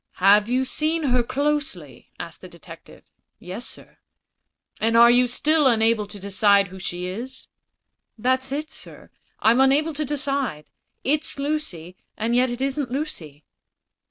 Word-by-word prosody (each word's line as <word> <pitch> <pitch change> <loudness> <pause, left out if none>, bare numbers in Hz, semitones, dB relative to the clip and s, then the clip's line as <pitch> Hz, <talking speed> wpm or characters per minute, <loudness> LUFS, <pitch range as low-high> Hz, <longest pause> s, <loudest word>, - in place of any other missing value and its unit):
"Have 205 +3 +5
you 255 +2 +1
seen 315 +4 -1
her 250 -3 +2
closely?" 290 +4 -3
asked - - -8
the - - -11
detective. - - -14 0.3
"Yes, - - -5
sir." - - -9 0.8
"And 225 +1 +2
are 235 +1 +8 0.2
still 300 +4 +2
unable 225 -3 +2
to 205 0 -8
decide 200 0 +3
who 190 +1 -10
she 180 0 -4
is?" 240 +8 -7 0.7
"That's 260 +3 0
it, 300 +3 -4
sir; - - -11 0.3
I'm 230 +3 +4
unable 290 +4 +3
to 300 +1 -2
decide. 275 - -2 0.3
It's 295 +2 0
Lucy: 275 - -3 0.2
and 230 +2 0
yet 250 +1 +3
it 240 +1 -5
isn't 275 -1 -1
Lucy." 165 - -5
250 Hz, 140 wpm, -23 LUFS, 210-285 Hz, 0.8 s, are